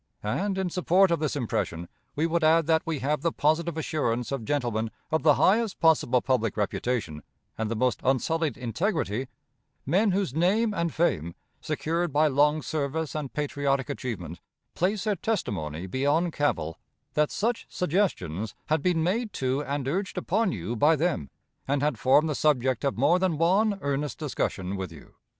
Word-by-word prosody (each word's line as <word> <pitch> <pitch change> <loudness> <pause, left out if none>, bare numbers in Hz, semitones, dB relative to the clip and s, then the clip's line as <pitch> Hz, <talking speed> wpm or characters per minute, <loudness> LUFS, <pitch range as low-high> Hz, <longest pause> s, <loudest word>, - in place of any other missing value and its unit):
And, 190 - -1
in 190 -2 -1
support 185 +1 +3
of 170 - +2
this 155 -2 -1
impression, 90 - -2 0.3
we 155 - +1
would 170 0 0
add 160 +1 +5
that 160 0 +3
we 165 -2 -2
have 150 +3 0
the 170 - +1
positive 160 +2 +1
assurance 125 -7 -1
of 135 -5 -3
gentlemen 120 -5 -1 0.2
of 160 - +2
the 150 -2 +5
highest 220 +1 +2
possible 150 -6 +3
public 120 -5 0
reputation 105 -6 -2 0.3
and 110 -1 -2
the 115 - -1
most 125 +2 +1
unsullied 145 +2 +1
integrity 130 - -1 0.6
men 195 +10 +3
whose 190 -7 0
name 205 +8 +2
and 170 -3 -1
fame, 85 - 0 0.3
secured 170 +1 -1
by 150 +3 +3
long 150 +1 +3
service 155 0 -2
and 150 -4 -4
patriotic 145 -2 -1
achievement, 95 - -5 0.3
place 195 +3 0
their 210 -2 +1
testimony 95 - -2
beyond 145 - +1
cavil 80 - -1 0.3
that 150 0 +2
such 230 +3 -1
suggestions 110 - -1
had 155 0 +2
been 165 -1 +1
made 215 +6 0
to 130 +2 -1
and 140 -2 -3
urged 190 +7 -2
upon 225 -4 +1
you 100 - -4
by 150 +8 +4
them, 155 - -1 0.4
and 140 +1 0
had 145 -6 0
formed 145 +4 +4
the 155 - -1
subject 130 -3 +1
of 140 -4 0
more 170 +8 +4
than 180 -4 +1
one 195 +6 +3
earnest 140 -1 -2
discussion 100 - -2
with 95 -3 -5
you. 80 - -14
150 Hz, 170 wpm, -27 LUFS, 125-170 Hz, 0.6 s, add